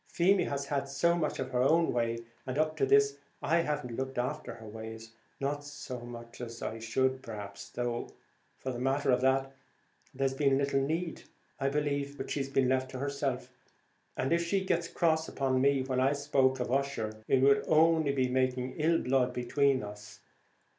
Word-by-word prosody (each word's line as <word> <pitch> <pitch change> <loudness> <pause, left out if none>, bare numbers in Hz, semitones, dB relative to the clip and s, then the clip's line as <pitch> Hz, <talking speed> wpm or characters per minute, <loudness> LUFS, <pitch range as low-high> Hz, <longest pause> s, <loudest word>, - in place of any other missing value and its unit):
Feemy 185 +2 +3
has 140 0 -2
had 140 -1 -1
so 140 +5 +2
much 155 -3 -1
of 130 0 -4
her 125 -1 +1
own 165 +5 +3
way, 115 -1 0 0.3
and 130 +1 -3
up 155 0 +1
to 135 - +2
this 140 0 +4 0.2
I 170 - +2
haven't 150 -7 -2
looked 130 0 -3
after 125 -1 -2
her 110 - -11
ways, 110 +1 -8 0.3
not 145 +1 -2
so 145 -3 -7
much 120 0 -9
as 115 -1 -7
I 110 - -4
should, 130 +4 0
perhaps; 105 -4 -8
though, 120 -1 -2 0.5
for 130 - -4
the 120 - -5
matter 135 +2 +1
of 125 0 +3
that 135 +1 +2 0.6
there's 135 0 0
been 135 0 +3
little 140 0 +1
need, 165 +5 -2 0.4
I 135 0 +1
believe; 145 -1 -1
but - - -5
she's 135 -2 -1
been 135 -1 +2
left 130 0 +1
to 130 - -6
herself, 135 -2 -2 0.7
and 135 - +1
if 170 0 +2
she 190 +3 0
got 170 -2 0
cross 160 -2 +2
upon 130 -2 0
me 140 -1 +3
when 130 -1 -1
I 135 +2 +3
spoke 140 -2 +2
of 125 -1 -2
Ussher, 115 -6 -1
it 135 -1 +3
would 140 0 +5
only 160 -1 +4
be 130 -2 +1
making 130 0 0
ill 165 +2 +3
blood 125 -2 +1
between 130 +1 +2
us. 105 0 -9
135 Hz, 190 wpm, -31 LUFS, 125-145 Hz, 0.7 s, would